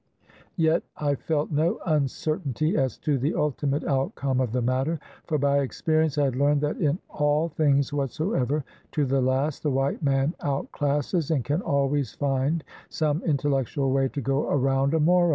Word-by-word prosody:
Yet 160 0 +3 0.2
I 145 -1 +1
felt 150 +2 -1
no 155 +3 +1
uncertainty 155 - 0
as 130 -4 0
to 145 -3 +2
the 140 +6 0
ultimate 145 -1 0
outcome 135 -1 0
of 125 -4 -1
the 125 0 0
matter; 130 +6 0 0.3
for 155 - +1
by 140 0 +2
experience 155 +2 0
I 145 - +3
had 135 -3 0
learned 145 +2 +2
that 150 0 -1
in 150 0 +1
all 150 +2 +1
things 145 -3 +1
whatsoever, 145 - -1 0.3
to 150 -2 +1
the 135 0 +1
last, 135 +3 0
the 150 - 0
white 135 +1 0
man 140 +1 +1
outclasses, 145 +3 -1
and 150 -6 +1
can 150 +5 0
always 140 -2 0
find 140 +3 0 0.3
some 155 +1 0
intellectual 140 -2 0
way 135 0 +2
to 140 - -4
go 135 +3 0
around, 135 +1 +2
a - - +2
Moro. 175 +3 +4
145 Hz, 170 wpm, -26 LUFS, 135-155 Hz, 0.3 s, Moro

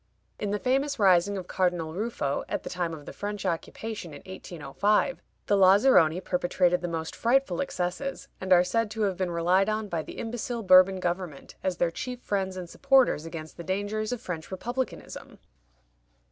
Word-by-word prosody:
In 205 - -2
the 205 - 0
famous 270 +5 0
rising 195 -1 +4
of 185 - -5
Cardinal 175 -4 -1
Ruffo, 185 -8 -2
at - - -2
the - - -6
time 175 -2 -2
of 155 -3 -8
the - - -8
French 205 -1 -5
occupation 180 +1 -4
in 145 - -11
1805, 190 - -1 0.2
the 205 - +3
Lazaroni 190 -3 +5
perpetrated 180 -1 +1
the 175 - -2
most 160 -1 -4
frightful 270 +4 +2
excesses, 270 +3 -3
and 185 0 -4
are 180 -1 +7
said 225 +4 0
to 220 0 -2
have 195 -2 +1
been 185 0 -1
relied 175 +4 +2
on 215 -1 -2
by 170 -3 -1
the - - -10
imbecile 235 0 -4
Bourbon 185 0 +6
government 175 -5 -4
as 185 -2 -1
their 170 - +1
chief 250 +7 -5
friends 190 -4 -2
and 180 -1 -5
supporters 265 - +3
against 160 -1 -8
the 170 - -7
dangers 205 +4 -2
of 245 - -2
French 175 -8 -6
Republicanism. 240 +7 -5
190 Hz, 175 wpm, -27 LUFS, 175-220 Hz, 0.2 s, are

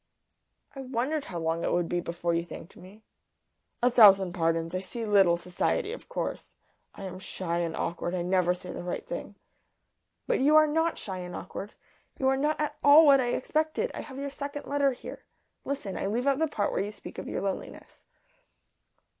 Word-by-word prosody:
"I 270 - -6
wondered 265 +4 -2
how 175 - -6
long 165 0 -1
it - - 0
would 175 -1 +1
be 175 - -1
before 170 0 -2
you 170 0 0
thanked 170 +1 -10
me." 195 +4 -15 0.8
"A 250 - +5
thousand 195 -6 +7
pardons. 165 -1 0
I 185 - 0
see 225 +5 -5
little 195 -5 +4
society, 180 - -1
of - - -10
course. - - -4 0.4
I - - -9
am 185 -1 -6
shy 180 -2 -3
and 165 -1 -2
awkward. 175 +1 -2
I 175 - -1
never 180 0 +2
say 180 0 -8
the - - -6
right 175 0 -4
thing." - - -6 0.9
"But - - +1
you 290 +4 +4
are 310 0 +8
not 325 +2 0
shy 190 -2 -5
and 180 0 -6
awkward. 195 +3 -7 0.4
You 265 - 0
are 270 - +3
not 300 +3 0
at 300 0 -2
all 295 +3 +8
what 275 -2 +7
I 245 -1 0
expected. 310 - -1
I - - -5
have 265 -3 -10
your 280 0 -4
second 285 +1 -6
letter 280 -1 +1
here. - - -10 0.4
Listen. 270 -9 -3
I - - -2
leave 235 +5 -1
out 275 0 +2
the 320 - +2
part 205 -9 -1
where - - 0
you 205 +1 -3
speak - - -10
of - - -7
your - - -3
loneliness." 195 -1 -6
205 Hz, 200 wpm, -28 LUFS, 180-280 Hz, 0.9 s, are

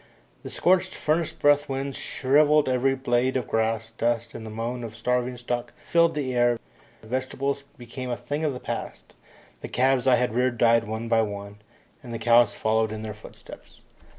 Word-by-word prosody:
The - - -8
scorching 185 +1 +2
furnace 155 +1 0
breath 145 0 +2
winds 135 0 -3
shrivelled 150 +2 +3
every 130 +1 +2
blade 130 0 +1
of 125 - -3
grass, 110 0 -1
dust 115 0 -1
and 115 - -8
the 110 - -7
moan 115 +3 -4
of 115 -1 -7
starving 125 +2 -1
stock 120 0 -4
filled 170 -1 +2
the 135 -4 -2
air, 120 -1 +3 0.5
vegetables 130 +4 -3
became 125 +1 -7
a 120 - -2
thing 145 +2 -4
of 155 - +1
the 125 - -6
past. - - -6 0.5
The - - -5
calves 130 +1 +2
I 130 - +6
had 125 -3 0
reared 125 0 +1
died 115 0 +4
one 110 +2 -4
by 115 -1 +3
one, 100 -1 -6 0.4
and 125 -5 -10
the 115 - -3
cows 120 0 +4
followed 110 0 +1
in 110 0 -6
their 110 -1 -5
footsteps. 105 - -14
120 Hz, 180 wpm, -25 LUFS, 115-135 Hz, 0.5 s, I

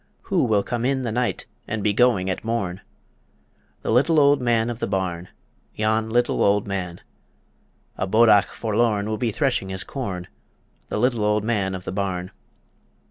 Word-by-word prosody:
Who - - +1
will 105 -4 +2
come 120 -1 -3
in 130 +1 0
the 115 - -2
night 120 +2 -1 0.2
and 110 -1 -3
be 105 0 +2
going 115 -5 +3
at 95 - -3
morn? 100 -5 -2 1.0
The - - -1
Little 145 +7 +4
Old 140 -1 +4
Man 120 -1 +1
of 120 - -7
the - - -2
Barn, 90 -3 -2 0.5
Yon 110 +1 0
Little 120 +2 +1
Old 100 0 +3
Man 90 -3 -4 1.0
A 95 - 0
bodach 110 0 +5
forlorn 110 -2 0
will 110 0 -2
be 120 - 0
threshing 125 -6 0
his 95 +1 -2
corn, 100 -9 -5 0.6
The - - -3
Little 120 -1 +1
Old 105 0 +1
Man 100 -4 0
of 90 - -7
the - - -3
Barn. 95 -2 -3
110 Hz, 170 wpm, -23 LUFS, 95-120 Hz, 1.0 s, bodach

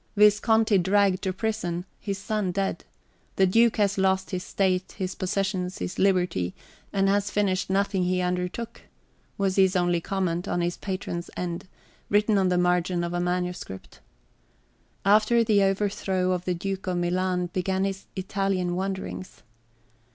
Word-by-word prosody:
"Visconti 210 0 +4
dragged 195 +1 +3
to 190 - -1
prison, 185 -4 -2
his 200 -2 -3
son 205 -2 -1
dead,... 195 +1 -2 0.5
the 190 - +4
duke 225 +5 +4
has 200 -2 +2
lost 190 0 +1
his 180 -1 -2
state, 185 -1 0
his 185 -1 -3
possessions, 190 -1 -2
his - - -5
liberty, 180 - +1 0.4
and 195 -1 +2
has 200 +1 +2
finished 195 -3 0
nothing 195 -1 +1
he 180 0 +1
undertook," 180 +5 -3 0.6
was 195 -1 0
his 190 -1 +4
only 175 -1 +2
comment 180 -2 -2
on - - 0
his 175 0 0
patron's 185 -3 -4
end, 175 0 -4 0.4
written 210 0 +3
on 190 -1 +2
the 180 - +2
{xii} 180 - +3
margin 180 0 +1
of 170 0 -3
a 175 - 0
manuscript. 180 - -3 1.1
After 215 +3 +5
the 215 -3 +3
overthrow 195 -1 0
of 180 -1 -2
the 180 - 0
Duke 195 +2 -4
of 180 -1 0
Milan, 180 0 0
began 190 +1 0
his 195 0 -3
Italian 190 -2 -1
wanderings. 190 0 -5
190 Hz, 150 wpm, -26 LUFS, 180-200 Hz, 1.1 s, After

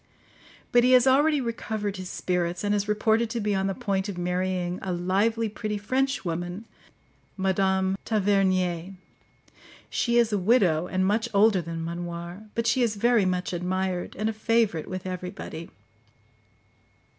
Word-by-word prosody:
But 240 0 +5
he 255 +1 +5
has 250 0 +6
already 290 +3 +4
recovered 220 -4 -3
his 185 -1 -6
spirits, 180 0 -2
and 205 0 +1
is 205 0 0
reported 220 +2 +2
to 235 - -3
be 210 -1 0
on 195 0 0
the 195 - -2
point 200 -4 -1
of 190 - -5
marrying 180 0 -1
a 190 - -3
lively 200 +6 +1
pretty 215 0 -4
Frenchwoman, 200 -5 -2 0.7
Madame 190 0 +1
Tavernier. 190 -4 +1 1.0
She 235 -1 +1
is 230 -2 +3
a 205 - +2
widow, 180 -6 +3
and 185 0 0
much 220 +4 +1
older 200 -2 +5
than 165 0 -5
Manoir; 170 +4 -6
but 230 - -1
she 235 +2 +2
is 230 -3 +1
very 235 0 +3
much 180 0 -1
admired, 180 +1 -2
and 215 +2 -1
a 220 - -1
favourite 215 -6 +1
with 185 0 -5
everybody. 180 -2 -6
195 Hz, 150 wpm, -26 LUFS, 180-220 Hz, 1.0 s, has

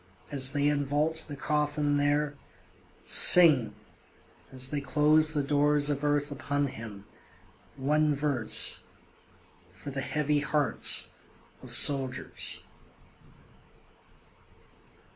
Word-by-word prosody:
As 135 -1 0
they 145 -1 -2
invault 150 +2 -2
the 145 - -9
coffin 150 0 -2
there, 145 +1 -1 0.7
Sing 140 -12 +6 0.8
as 130 0 -1
they 145 -1 -4
close 155 +2 +2
the 145 - -1
doors 145 +1 0
of 145 0 -5
earth 145 0 -2
upon 145 +1 -4
him 105 -4 -12 0.7
one 150 +2 -1
verse, 140 -6 0 0.9
For 140 +9 -10
the 135 0 -6
heavy 150 +1 -2
hearts 150 0 0 0.5
of - - -9
soldiers. 135 -3 +1
145 Hz, 95 wpm, -26 LUFS, 135-150 Hz, 0.9 s, Sing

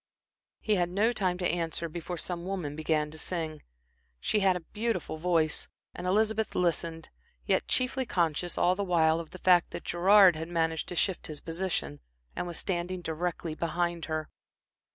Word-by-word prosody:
He 215 -2 +2
had 175 -1 +1
no 210 +6 +2
time 185 -5 0
to 180 - 0
answer 170 0 -1
before 170 +2 -5
some 170 +1 -4
woman 180 -6 -3
began 155 -1 0
to 160 - -7
sing. 160 -3 -3 0.6
She 210 - +1
had 190 -2 +4
a 180 - -3
beautiful 210 -7 -2
voice, 165 -2 +1 0.3
and 180 - -5
Elizabeth 220 +3 +1
listened, 165 -2 0 0.4
yet - - +1
chiefly 255 0 0
conscious, 170 -1 0
all 180 - +4
the 200 - -1
while, 165 -3 +3
of 165 -2 -7
the - - -10
fact 180 -1 +4
that - - -6
Gerard 190 +1 +6
had 160 +1 -4
managed 165 -2 0
to 180 - -5
shift 190 +1 0
his 150 -2 -6
position, 165 - -3 0.4
and - - -3
was 175 - -4
standing 180 -1 -2
directly 165 0 -3
behind 170 +1 -1
her. 155 -1 -3
175 Hz, 175 wpm, -29 LUFS, 160-185 Hz, 0.6 s, Gerard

